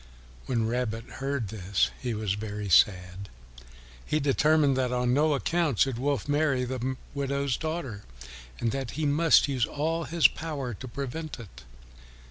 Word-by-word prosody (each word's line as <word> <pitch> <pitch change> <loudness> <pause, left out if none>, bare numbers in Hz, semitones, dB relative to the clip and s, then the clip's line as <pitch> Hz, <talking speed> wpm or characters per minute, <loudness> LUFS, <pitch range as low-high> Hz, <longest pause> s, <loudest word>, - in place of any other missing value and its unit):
When 115 -3 0
Rabbit 115 -1 -2 0.2
heard 135 -6 -2
this 100 -2 0
he 120 -3 -2
was 105 -3 -1
very 105 -1 -5
sad; 90 +1 +3 0.7
he 155 - 0
determined 145 0 +3
that 130 -1 0
on 125 0 +1
no 150 +2 +3
account 160 -3 0
should 130 -1 +2
Wolf 140 -3 -1
marry 145 -3 +1
the 130 +1 -3 0.2
widow's 140 -1 -1
daughter, 155 -10 -4 0.6
and 115 - 0
that 135 0 -3
he 155 - 0
must 150 +3 +4
use 130 -4 0
all 165 +3 -2
his 170 0 +5
power 145 -6 -5
to 130 +5 -8
prevent 140 +4 -5
it. 105 - -12
130 Hz, 150 wpm, -28 LUFS, 115-145 Hz, 0.7 s, his